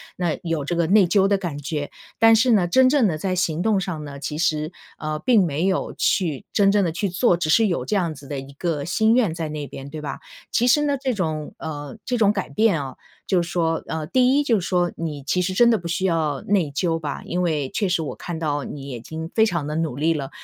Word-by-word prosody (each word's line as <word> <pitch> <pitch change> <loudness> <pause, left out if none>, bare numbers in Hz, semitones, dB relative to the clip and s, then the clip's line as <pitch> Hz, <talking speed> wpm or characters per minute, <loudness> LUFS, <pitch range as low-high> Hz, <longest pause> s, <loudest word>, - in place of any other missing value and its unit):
那 175 -3 -1
有 165 -5 -2
这 175 - -2
个 170 -1 +1
内 200 +2 +5
疚 195 +2 +3
的 200 0 +2
感 170 -7 -5
觉， 145 0 -4 0.3
但 225 0 +6
是 240 +3 +3
呢， 190 -5 +3
真 255 +8 +5
正 270 -5 +3
地 155 -4 -2
在 185 +2 -1
行 170 -2 0
动 210 0 +2
上 180 -5 -4
呢， 140 -1 -8
其 150 +1 -4
实， 155 -1 0 0.3
呃， 155 0 -3
并 220 0 +4
没 160 +3 -1
有 190 - -1
去 160 -8 0
真 195 -1 +4
正 205 0 +3
地 170 - 0
去 175 +5 -2
做， 180 +1 +2
只 160 -3 0
是 225 +6 +5
有 175 - -1
这 215 - -1
样 170 -5 0
子 140 0 -13
的 140 -1 -4
一 135 +1 -10
个 150 0 -2
心 220 +8 +2
愿 235 -7 +3
在 165 -2 -3
那 150 -1 -5
边， 135 +1 -9
对 155 0 -6
吧？ 140 -2 -5 0.3
其 240 - +2
实 295 +4 +5
呢， 285 -1 +1
这 260 -1 -1
种 155 -7 -3
呃， 145 0 -6
这 250 - -1
种 210 -3 +4
改 195 -3 -3
变 210 -8 +2
啊， 135 -1 -7 0.3
就 185 -2 +2
是 170 - -7
说 165 -2 0
呃， 160 -1 -4
第 255 - +3
一 - - +2
就 230 -7 +2
是 175 - -5
说， 175 -2 +1
你 155 -4 -4
其 180 +6 0
实 185 +1 -1
真 235 +5 +5
的 230 - +4
不 170 - -7
需 170 +3 -1
要 155 -6 0
内 185 -7 +1
疚 165 +3 0
吧， 145 -3 -5
因 180 - -2
为 155 -6 0
确 200 +5 -1
实 175 -2 +1
我 150 - -5
看 175 -2 -6
到 145 -3 -1
你 140 -1 -7
已经 160 +6 -6
非 220 - +5
常 170 -8 -1
地 150 - -3
努 160 -5 -1
力 160 +4 +1
了。 140 -3 -4
170 Hz, 280 characters per minute, -23 LUFS, 155-200 Hz, 0.3 s, 但